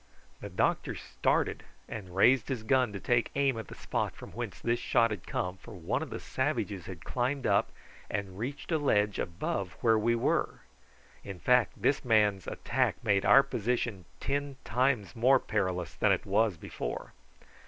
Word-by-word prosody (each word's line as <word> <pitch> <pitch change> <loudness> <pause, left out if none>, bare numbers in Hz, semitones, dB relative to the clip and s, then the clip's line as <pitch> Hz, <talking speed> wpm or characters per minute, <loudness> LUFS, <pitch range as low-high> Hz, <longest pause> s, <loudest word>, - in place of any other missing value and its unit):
The - - -7
doctor - - 0
started - - 0 0.3
and 95 -4 -7
raised 125 +7 +4
his 125 -5 -2
gun 130 -1 +2
to 100 - -5
take 120 +3 +1
aim 140 -2 +2
at 110 - -7
the - - -10
spot - - -2
from - - -11
whence - - -5
this 120 0 0
shot 115 -1 +2
had 105 -5 -6
come, 90 +1 -2
for 100 - -12
one 95 - -2
of 160 - -5
the - - -5
savages 110 - -2
had 90 -4 -9
climbed 130 +2 -1
up 100 - +2 0.4
and 100 -1 -4
reached 135 +8 -5
a 160 - +2
ledge 105 -8 +2
above 90 +2 -3
where 115 -2 +4
we 115 +2 +2
were. 115 - 0 0.6
In 100 -2 -7
fact 125 0 +3
this 140 - +2
man's 105 -5 +3
attack - - 0
made 100 -1 +2
our 135 - +8
position 120 -6 -2
ten 140 0 -2
times 120 -6 0
more 130 +4 +5
perilous 95 -6 -2
than - - +2
it - - +1
was 105 -1 +2
before. - - -6
110 Hz, 175 wpm, -30 LUFS, 100-130 Hz, 0.6 s, our